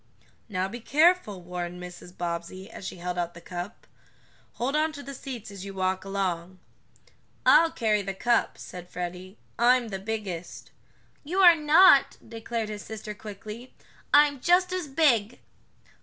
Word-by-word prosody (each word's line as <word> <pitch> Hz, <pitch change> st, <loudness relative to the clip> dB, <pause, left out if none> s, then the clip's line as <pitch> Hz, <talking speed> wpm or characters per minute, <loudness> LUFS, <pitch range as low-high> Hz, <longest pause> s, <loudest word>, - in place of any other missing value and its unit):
"Now 185 Hz, -2 st, -1 dB
be 235 Hz, +5 st, -7 dB
careful," 290 Hz, -, +2 dB
warned 180 Hz, 0 st, -5 dB
Mrs. 180 Hz, 0 st, -10 dB
Bobbsey, 175 Hz, +4 st, -5 dB
as 190 Hz, -, -8 dB
she -, -, -6 dB
held 180 Hz, 0 st, -4 dB
out 175 Hz, -1 st, -3 dB
the -, -, -9 dB
cup. 175 Hz, +3 st, -7 dB, 0.7 s
"Hold 260 Hz, +5 st, -2 dB
on 310 Hz, +1 st, +2 dB
to 285 Hz, -1 st, -8 dB
the 275 Hz, -, -8 dB
seats 245 Hz, -6 st, -7 dB
as 195 Hz, -2 st, -8 dB
you 195 Hz, -1 st, -8 dB
walk 185 Hz, 0 st, -1 dB
along." 185 Hz, -2 st, -3 dB, 0.9 s
"I'll 330 Hz, -, +7 dB
carry 215 Hz, -7 st, +1 dB
the 195 Hz, 0 st, -5 dB
cup," 240 Hz, +4 st, +1 dB
said 180 Hz, -1 st, -10 dB
Freddie. 180 Hz, +3 st, -6 dB, 0.2 s
"I'm 245 Hz, 0 st, +4 dB
the 195 Hz, -2 st, -4 dB
biggest." 195 Hz, -5 st, -6 dB, 0.5 s
"You 355 Hz, +6 st, 0 dB
are 350 Hz, -2 st, +9 dB
not!" 305 Hz, 0 st, +6 dB
declared 225 Hz, 0 st, -4 dB
his 210 Hz, -1 st, -6 dB
sister 215 Hz, -1 st, -7 dB
quickly. 210 Hz, +4 st, -10 dB, 0.4 s
"I'm 290 Hz, -1 st, +5 dB
just 360 Hz, +3 st, +3 dB
as 365 Hz, -4 st, -2 dB
big." 255 Hz, -7 st, +2 dB
210 Hz, 155 wpm, -27 LUFS, 185-270 Hz, 0.9 s, are